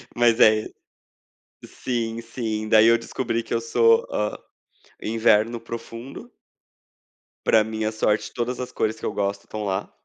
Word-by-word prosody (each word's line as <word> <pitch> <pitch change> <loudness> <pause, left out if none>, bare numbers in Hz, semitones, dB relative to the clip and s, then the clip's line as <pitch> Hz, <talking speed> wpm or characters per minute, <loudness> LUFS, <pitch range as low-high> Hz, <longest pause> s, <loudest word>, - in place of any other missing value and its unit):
mas 120 0 +3
é 110 -2 +7
ele - - -8 0.9
Sim, 115 -2 -3
sim. 110 -2 -4
Daí 110 0 +6
eu 115 - +6
descobri 115 0 -3
que - - -6
eu 115 - +2
sou, 115 0 +3
hã, 105 0 -2 0.6
inverno 115 +1 +2
profundo. 115 +2 -9 1.1
Pra 110 -1 +5
minha 110 0 -3
sorte 110 -1 0
todas 125 +1 -3
as 125 - -5
cores 110 0 -2
que - - -7
eu - - -2
gosto 100 0 -2
estão 110 -1 -6
lá. 95 0 -3
115 Hz, 150 wpm, -23 LUFS, 110-115 Hz, 1.1 s, é